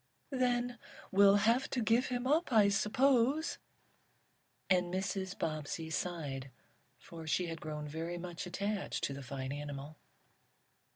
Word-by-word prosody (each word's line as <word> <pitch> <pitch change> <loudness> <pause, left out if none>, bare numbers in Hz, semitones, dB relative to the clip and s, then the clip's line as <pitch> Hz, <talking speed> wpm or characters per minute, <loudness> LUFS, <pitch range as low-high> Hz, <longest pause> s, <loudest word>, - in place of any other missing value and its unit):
"Then 245 -2 0 0.3
we'll 200 +1 +7
have 230 +6 +3
to 255 - -1
give 230 +2 +3
him 245 0 -2
up 305 +3 +2
I 215 -3 +6
suppose," 255 +8 +2 1.1
and 180 -2 +3
Mrs. 190 0 -2
Bobbsey 160 0 -3
sighed, 145 -7 -3 0.5
for 165 -1 -10
she 180 +3 +1
had 165 -1 -5
grown 150 -1 -5
very 165 +3 -4
much 175 +2 -6
attached 200 +3 -2
to 140 - 0
the 140 - -7
fine 130 0 -5
animal. 145 +1 -6
185 Hz, 130 wpm, -34 LUFS, 155-230 Hz, 1.1 s, we'll